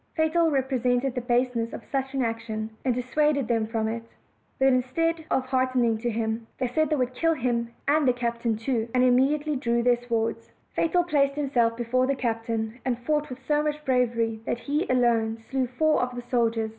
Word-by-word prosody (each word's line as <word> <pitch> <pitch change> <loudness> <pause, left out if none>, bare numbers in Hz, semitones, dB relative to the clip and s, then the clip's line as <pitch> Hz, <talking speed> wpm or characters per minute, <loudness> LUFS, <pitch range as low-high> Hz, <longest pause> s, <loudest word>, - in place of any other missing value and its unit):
Fatal 325 +1 +2
represented 260 -2 +1
the 250 - -2
base 245 +1 +1
ness 230 0 -2
of - - -7
such 270 0 -2
an 265 - +1
action, 225 -1 -3
and 255 -3 +1
dissuaded 280 +1 +1
them 225 -2 +1
from 220 -1 -1
it; 230 +1 -3 0.6
but 265 - +3
instead 315 +6 0
of 260 - +1
hearkening 255 -3 +1
to 240 +1 -1
him, 225 0 -2
they 260 - -1
said 295 +5 +1
they 305 - +2
would 255 -2 -1
kill 330 +5 +1
him 235 -3 -1 0.2
and 295 0 +3
the - - +6
captain 235 -1 -1
too, 230 0 -1
and 250 - +4
immediately 285 +4 +3
drew 235 -3 0
their 245 0 +4
swords. 230 -1 -2 0.2
Fatal 350 +2 +2
placed 280 -4 +1
himself 245 -6 +1
before 250 +2 +1
the 275 - +1
captain, 230 -1 -2
and 250 -2 0
fought 295 +4 -1
with 255 - -6
so 295 +1 +2
much 300 0 -3
bravery 235 -4 +1
that 235 - -2
he 295 +5 -1
alone 235 -3 +2
slew 255 +3 -2
four 310 +5 +2
of 250 0 -2
the 245 - -4
soldiers. 230 -3 0
250 Hz, 195 wpm, -26 LUFS, 230-275 Hz, 0.6 s, the